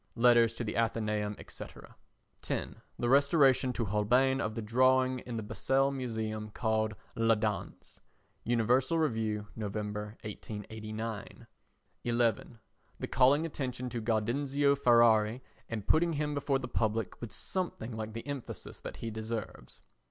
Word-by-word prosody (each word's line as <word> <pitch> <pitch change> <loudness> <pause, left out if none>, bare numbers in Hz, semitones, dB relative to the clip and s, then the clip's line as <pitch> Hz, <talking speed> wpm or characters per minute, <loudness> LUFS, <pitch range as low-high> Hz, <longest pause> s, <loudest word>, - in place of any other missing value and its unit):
[Letters 120 -1 +5
to 120 - -3
the 110 - -3
Athenæum, 105 -2 0 0.2
&c.] - - -6 0.8
10. - - -3 0.2
The 120 - -1
restoration 140 -1 +4
to 115 -1 -1
Holbein 125 +7 +2
of 110 0 -2
the 115 - -3
drawing 130 +3 +3
in 120 -1 -6
the 110 - -3
Basel 135 +5 +1
Museum 110 -5 -3
called 110 -1 0 0.2
La 115 0 +4
Danse. 105 -1 -4 0.4
[Universal 120 +6 +2
Review, 110 -8 0
Nov., 105 -2 -4
1889.] 110 +1 -6 0.6
11. 120 -1 0 0.4
The - - -4
calling 135 +5 +4
attention 130 -5 -4
to 120 - -3
Gaudenzio 135 +6 +1
Ferrari 115 -2 +4 0.3
and 110 -4 -4
putting 165 +5 +3
him 150 0 -1
before 140 -1 +1
the 135 - -5
public 110 -2 -1
with 120 - -6
something 150 -11 -3
like 110 0 -5
the 115 - -6
emphasis 140 -3 -6
that - - -7
he 115 - -5
deserves. 110 - -6
115 Hz, 135 wpm, -31 LUFS, 110-130 Hz, 0.8 s, Letters